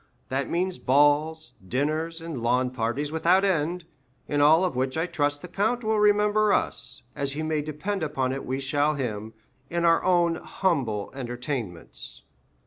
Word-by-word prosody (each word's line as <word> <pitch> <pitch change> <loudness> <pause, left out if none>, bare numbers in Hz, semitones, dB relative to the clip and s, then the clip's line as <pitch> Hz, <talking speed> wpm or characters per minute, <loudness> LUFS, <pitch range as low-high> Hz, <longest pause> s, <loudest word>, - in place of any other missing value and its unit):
That 135 +1 -1
means 180 +1 -1
balls, 145 +4 +2
dinners, 155 - -1
and 165 -7 -5
lawn 125 +2 +1
parties 130 +4 -2
without 175 +5 +3
end, 175 -1 0 0.4
in 145 0 +1
all 160 +4 +6
of 180 -8 -1
which 130 +3 -1
I 160 - +1
trust 145 -4 -1
the - - -6
count 220 +7 0
will 220 0 +1
remember 210 0 +4
us, - - -2
as 140 -1 -1
he 155 +2 -3
may 155 -1 0
depend 155 +7 -3
upon 135 -4 -1
it 135 - -4
we 130 +1 -3
shall 145 +2 +1
him, 110 -5 -4 0.3
in 170 0 0
our 165 0 +4
own 175 -2 +3
humble 130 - -1
entertainments." 120 - -4
150 Hz, 160 wpm, -26 LUFS, 130-175 Hz, 0.4 s, all